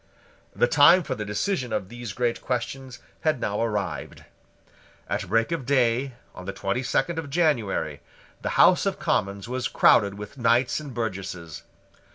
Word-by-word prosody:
The - - +4
time 160 +7 +6
for 140 -3 -3
the 110 -4 -5
decision 125 - -2
of 95 - -2
these 120 -2 -7
great 120 +4 -1
questions 125 +1 -4 0.2
had 155 -5 0
now 105 -3 -1
arrived. 105 -4 -3 0.8
At - - -2
break 115 - +1
of 165 -5 -2
day, 130 -1 +1 0.2
on 90 - -10
the 95 - -4
twenty 95 +6 -2
second 135 +5 0
of 150 -3 -6
January, 120 - 0 0.4
the - - -3
House - - +5
of - - -1
Commons 100 +1 -1
was 125 0 -2
crowded 100 -3 +4
with 105 +6 -9
knights 120 +4 +2
and 150 -3 -8
burgesses. 95 - -5
120 Hz, 160 wpm, -25 LUFS, 100-135 Hz, 0.8 s, time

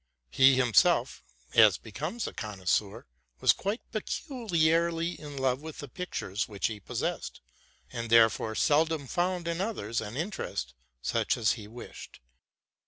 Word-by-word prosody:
He 130 - +6
himself, 125 - +3 0.3
aus 110 -5 +7
becomes 155 - -5
a - - -5
connoisseur, 100 -1 -2 0.3
was - - +5
quite 205 +5 -3
peculiarly 170 - 0
in 145 -4 -9
love 130 0 0
with 160 0 -8
the 145 - -7
pictures 125 - -4
which 100 -2 -4
he 110 -2 -1
possessed, 95 - -4 0.5
and 115 -2 -4
therefore 115 -1 +4
seldom 155 +1 +2
found 175 +4 -1
in 170 +1 -1
others 120 - -2
an 110 +3 -6
interest 160 - -4 0.3
such - - 0
as 110 -2 +3
he 105 -3 -5
wished. 120 +3 -11
135 Hz, 135 wpm, -29 LUFS, 110-170 Hz, 0.5 s, aus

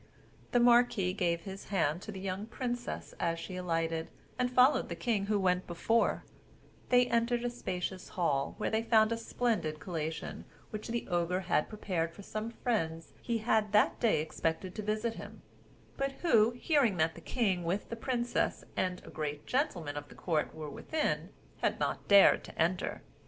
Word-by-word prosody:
The 245 - +4
marquis 240 -6 +4
gave 170 -2 0
his 195 +2 -8
hand 170 -4 0
to 215 - -7
the 190 - -7
young 195 +2 -4
princess 245 0 -4
as 165 -1 0
she 170 +3 -6
alighted, 165 -2 -1 0.3
and 250 0 +2
followed 255 +3 +4
the - - -3
king 210 -5 0
who 210 -1 +2
went 180 -1 +1
before; 225 +7 +1 0.7
they 245 0 +6
entered 235 0 +1
a 245 - 0
spacious 185 -5 -4
hall, 140 -6 0
where - - -1
they 220 0 +2
found 225 -1 +4
a - - +2
splendid 225 -10 -1
collation 160 -3 -4 0.3
which 215 0 -5
the 235 0 -3
Ogre 175 +1 0
had 175 -4 +1
prepared 180 -6 -2
for 200 - -10
some 215 +3 -4
friends 165 -9 -2
he 235 -1 -1
had 215 -3 +2
that 210 - +4
day 215 -10 +3
expected 160 +3 -2
to - - -4
visit 215 +2 -1
him; - - -10 0.5
but 275 0 -1
who, 230 -10 +5
hearing 245 - +2
that 160 0 +2
the 170 - -12
king 195 -5 0
with 180 +5 -2
the 230 - -3
princess 240 0 -1
and 180 -1 -1
a - - -10
great 150 -2 -4
gentleman 175 - -1
of 145 0 -6
the - - -13
court 160 -4 -1
were 155 -1 -6
within, 315 -1 -1 0.3
had - - 0
not - - -2
dared 200 -1 +7
to - - -12
enter. 180 +4 0
200 Hz, 180 wpm, -32 LUFS, 170-235 Hz, 0.7 s, dared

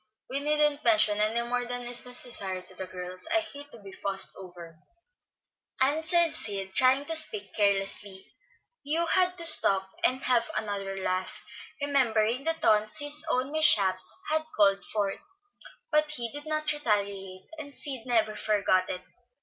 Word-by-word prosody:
We 275 - -1
needn't 295 0 +1
mention 215 -2 +3
any 230 +3 0
more 245 0 -1
than 245 0 -4
is 245 +1 0
necessary 200 -7 -4
to 185 - -6
the 185 0 -7
girls; 185 0 -6
I 335 - +4
hate 290 -3 -8
to 230 -7 -15
be 195 - -11
fussed 195 0 +2
over," 175 -3 -11 1.0
answered 320 +5 +3
Sid, 195 -2 -4
trying 260 +4 +3
to 325 - -2
speak 385 +6 +1
carelessly. 195 -1 -1 0.5
Hugh 320 +4 0
had 365 +1 +3
to 340 - -1
stop 190 -11 +4
and 260 +1 +1
have 240 -2 +2
another 200 -2 -4
laugh, 185 -1 -3 0.4
remembering 255 -4 0
the 325 - +1
taunts 215 -8 +1
his 295 +1 -4
own 260 0 0
mishaps 200 -12 +3 0.2
had 315 0 +1
called 200 -1 +3
forth; 200 -2 -2 0.7
but 305 0 +2
he 240 -6 -1
did 290 +1 -9
not 310 0 0
retaliate, 200 -8 -2
and 285 -2 -7
Sid 265 -4 -6
never 220 -3 +1
forgot 200 -4 +1
it. 180 - -4
235 Hz, 155 wpm, -27 LUFS, 195-290 Hz, 1.0 s, I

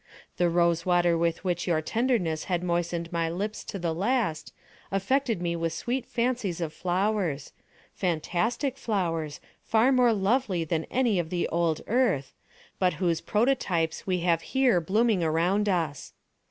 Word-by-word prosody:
The 175 -1 +3
rose 170 -1 +2
water 175 -1 +3
with 170 +1 0
which 175 -2 -1
your 165 -3 +2
tenderness 195 -4 0
had 180 -1 -1
moistened 170 -1 -1
my 165 -1 0
lips 205 +5 -4
to 200 - -5
the 170 -3 -1
last, 200 -2 -1 0.4
affected 220 +1 0
me 170 -1 -1
with 165 -1 -2
sweet 245 +9 -3
fancies 240 -7 -1
of 160 -3 -3
flowers—fantastic 185 - -2
flowers, 165 - -2 0.2
far 230 +4 +3
more 250 -2 +4
lovely 205 -3 +1
than 160 0 -2
any 240 -7 +1
of 165 -2 -2
the 175 0 -1
old 165 -2 0
Earth, 210 - +1 0.5
but 180 -1 +2
whose 170 -3 0
prototypes 210 -7 0
we 180 -2 0
have 170 -1 +2
here 255 -8 +2
blooming 210 +1 +2
around 175 +6 +1
us. 165 -6 -2
180 Hz, 145 wpm, -27 LUFS, 165-220 Hz, 0.5 s, more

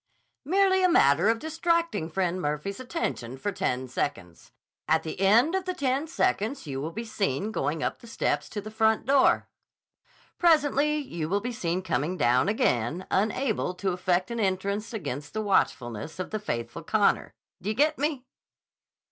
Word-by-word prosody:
"Merely 380 +4 +3
a 365 - +5
matter 165 - +4
of 225 - +3
distracting 330 - 0
Friend 180 +1 -1
Murphy's 150 - -3
attention 245 - -4
for 205 +10 -2
ten 130 -8 -2
seconds. 120 - -4 0.4
At 160 +1 +3
the 160 - -6
end 230 - +5
of 380 -1 -1
the 365 -1 -2
ten 275 +3 0
seconds 270 -5 0
you 135 -2 -4
will 155 - -3
be 225 +6 -5
seen 205 - -1
going 160 -6 -1
up - - -2
the 235 - -14
steps 230 - -1
to 205 - -4
the 215 +2 -8
front 220 0 +2
door. 275 0 +4 0.9
Presently 300 -3 +3
you 170 - -4
will 200 +3 +2
be 245 +4 -4
seen 180 -3 -2
coming 165 +1 -1
down 125 +7 +3
again, 155 - 0
unable 215 -1 0
to 190 +1 -1
effect 180 +2 0
an 235 - -3
entrance 200 +2 -1
against 150 - -5
the 215 - 0
watchfulness 125 - 0
of 185 - -5
the 215 - -2
faithful 120 - -4
Connor. - - +1 0.3
Do 195 - -3
you 215 - -1
get 300 +4 +2
me?" 285 -3 -1
200 Hz, 170 wpm, -27 LUFS, 160-265 Hz, 0.9 s, a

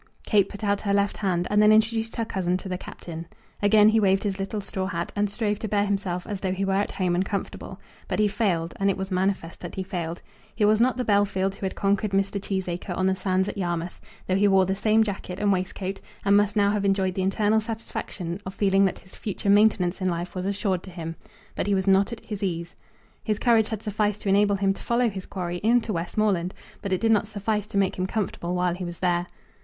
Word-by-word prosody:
Kate 205 -3 +3
put 205 +1 -9
out 200 -1 +1
her 200 -1 +1
left 200 0 +1
hand, 180 -3 0
and 210 0 +4
then 210 0 +7
introduced 225 +1 +2
her 230 - -1
cousin 185 -4 -1
to 190 - -8
the 185 - -2
Captain. 170 -2 -8 0.3
Again 210 +1 +6
he 220 +1 +4
waved 195 -2 +3
his 200 -2 -2
little 195 +2 -3
straw 190 -1 -3
hat, 170 -3 -3
and 205 0 +1
strove 210 0 -1
to 220 - -3
bear 205 0 +1
himself 195 -3 -2
as 205 -2 -4
though 190 -1 -1
he 195 +1 -1
were 195 - 0
at 200 +2 0
home 185 -3 0
and 180 +2 +2
comfortable. 200 0 -5 0.3
But - - -1
he 215 -1 +4
failed, 180 -6 0
and 195 0 +3
it 195 - 0
was 190 0 -4
manifest 185 -2 -1
that 175 - -7
he 190 - -2
failed. 175 -3 -4 0.4
He 210 -1 +2
was 215 +1 +4
not 255 +1 +3
the 250 - -1
Bellfield 200 -2 +2
who 195 0 -3
had - - -6
conquered 200 0 0
Mr. 195 +1 0
Cheesacre 185 -2 -3
on 185 - +1
the 190 0 +2
sands 185 0 0
at 205 - -4
Yarmouth, 175 -1 -3 0.2
though 185 - +1
he 205 +2 +4
wore 190 -1 +5
the 190 +1 0
same 220 +2 +3
jacket 195 -3 -5
and 205 -1 +2
waistcoat, 190 +1 -3 0.3
and 200 0 +5
must 205 0 +3
now 200 -1 +4
have 210 -1 0
enjoyed 195 -1 +1
the 190 - -2
internal 205 +3 +2
satisfaction 210 -5 -5
of 190 +1 -7
feeling 195 -1 +3
that 190 - 0
his 185 - -16
future 200 -1 -1
maintenance 200 -3 +3
in 185 - +1
life 175 +1 -3
was 185 0 -3
assured 200 -2 0
to 190 - -11
him. 165 -2 -6 0.4
But - - -2
he 200 - +3
was 190 -1 0
not 195 +2 +4
at 235 - -8
his 210 -2 -5
ease. 170 -3 -2 0.5
His 215 -2 0
courage 225 -2 +3
had 220 -2 -4
sufficed 210 -1 -1
to 200 - -2
enable 200 +1 +4
him 195 0 +1
to - - -12
follow 240 0 +2
his 190 -1 -7
quarry 175 -2 -4
into 230 +2 +2
Westmoreland, 180 +1 0 0.3
but 200 - -4
it 185 - +1
did 225 0 +3
not 210 -1 +3
suffice 210 0 -2
to 205 - -4
make 195 -1 +1
him 185 - 0
comfortable 180 -4 -2
while 180 -1 +1
he 180 +1 -5
was 175 -1 -5
there. 175 -1 0
195 Hz, 245 wpm, -25 LUFS, 185-210 Hz, 0.5 s, then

